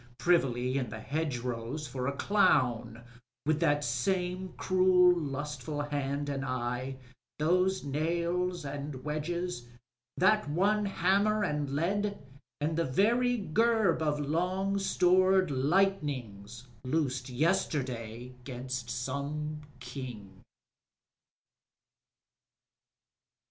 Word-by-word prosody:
Privily 130 -6 +2
m 125 -4 -3
the 110 - -7
hedgerows 125 -1 -3
for 125 -1 -4
a - - +1
clown 120 - +2 0.4
With 155 0 +2
that 145 -3 +2
same 180 +9 -1
cruel 185 -1 +5
lustful 145 -1 -3
hand 145 0 -2
and 140 -1 -2
eye, 125 0 -2 0.4
Those 180 +5 +2
nails 170 +4 -1
and 140 -1 -5
wedges, 155 -2 -3 0.5
that 210 0 +3
one 205 +7 +2
hammer 200 +3 +2
and 150 -5 -1
lead. 200 +6 0 0.4
And 155 +2 0
the 165 - +2
very 240 - +2
gerb 215 -1 +2
of 150 -1 0
long 180 +7 0
stored 185 -1 +3
lightnings 130 - 0 0.2
loosed 130 -2 -1
Yesterday 125 - -1
'gainst 125 -1 -5
some 140 +5 -3 0.2
King. 125 -7 -8
150 Hz, 95 wpm, -30 LUFS, 130-180 Hz, 0.5 s, cruel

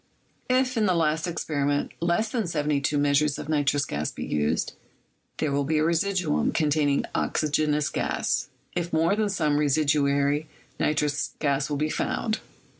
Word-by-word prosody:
If, 255 0 +2
in 215 -2 +3
the 185 - +2
last 160 0 +1
experiment, 145 -4 -1
less 175 +6 +1
than 225 -2 -1
'j'Z 150 -2 0
measures 145 0 +2
of - - -6
nitrous 145 -2 +1
gas 75 -4 -2
be - - -6
used, 75 0 0 0.6
there 155 - 0
will 140 0 +1
be 155 +3 0
a 155 - +2
residuum 170 0 +1
containing 150 -2 +2
oxygenous 150 -1 +1
gas; - - -1 0.3
if 175 0 -2
more, 165 +4 +2
then 215 -1 0
some 155 -6 +1
residuary 145 0 +2 0.3
nitrous 150 -1 0
gas 140 -1 0
will 145 - -1
be 155 +1 0
found. 220 -1 -1
150 Hz, 150 wpm, -26 LUFS, 145-170 Hz, 0.6 s, in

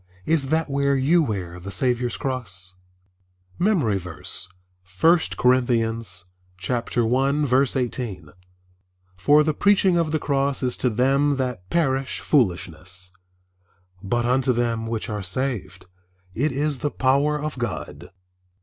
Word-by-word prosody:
Is 150 -5 +1
that 160 +1 +1
where 140 0 +1
you 150 +6 +3
wear 95 - -3
the 95 +3 -8
Saviour's 125 +2 0
cross? 100 -9 -3 0.9
MEMORY 155 - +2
VERSE, 90 +1 -2 0.5
I 170 +2 +7 0.2
Corinthians 115 -7 +1 0.4
1: 125 +4 +1 0.3
18 120 - -3 0.9
"For 145 +12 +4
the 155 0 0
preaching 195 0 +3
of 165 -2 +1
the 155 - +2
cross 140 -2 0
is 125 -1 0
to 125 - +1
them 135 +5 +2
that 125 -9 -4
perish 135 -5 0
foolishness; 90 - -1 0.9
but 120 +5 -1
unto 130 +1 +2
them 115 -2 -1
which 115 -1 -3
are 105 -1 -3
saved 100 -2 -2 0.5
it 145 +9 0
is 140 +1 -1
the 145 - -1
power 140 +3 +1
of 150 -3 -4
God." 120 -5 -5
125 Hz, 120 wpm, -23 LUFS, 105-140 Hz, 0.9 s, I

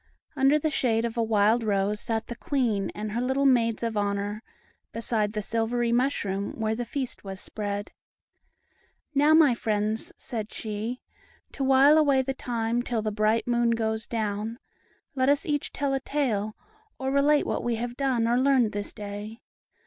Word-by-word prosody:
Under 275 +1 +4
the 305 +1 -1
shade 230 -5 +1
of 230 0 -3
a 235 - +1
wild 220 +1 +3
rose 205 0 0
sat 225 -1 -2
the 240 - -7
Queen 235 -9 0
and 210 0 -4
her 235 +3 -1
little 265 +2 +1
Maids 235 -4 +3
of 230 -1 -1
Honor, 205 +1 -1 0.5
beside 220 -2 -1
the 210 -1 -3
silvery 230 +2 0
mushroom 205 -6 0
where 220 0 0
the 240 +2 -3
feast 260 +2 -4
was 195 -1 -7
spread. 205 0 -4 1.2
"Now, 295 +2 +5
my 310 -6 +6
friends," 215 -1 -1
said 220 -4 -5
she, 220 +3 -4 0.5
"to 275 - -4
while 270 +3 +6
away 280 -3 +3
the 270 +1 -2
time 235 -2 -1
till 235 -3 -2
the 215 - -1
bright 215 +2 +1
moon 240 -1 +2
goes 220 -1 -2
down, 220 0 -2 0.6
let 260 -1 +2
us 285 0 +2
each 295 -2 -1
tell 280 -1 -1
a 270 - +1
tale, 230 -7 -1 0.4
or 265 0 -2
relate 285 +2 +3
what - - -2
we 240 -1 0
have 240 +1 -4
done 255 -4 +1
or 240 +1 +3
learned 260 -4 +3
this 205 0 -4
day. 210 +2 -7
230 Hz, 170 wpm, -27 LUFS, 215-265 Hz, 1.2 s, my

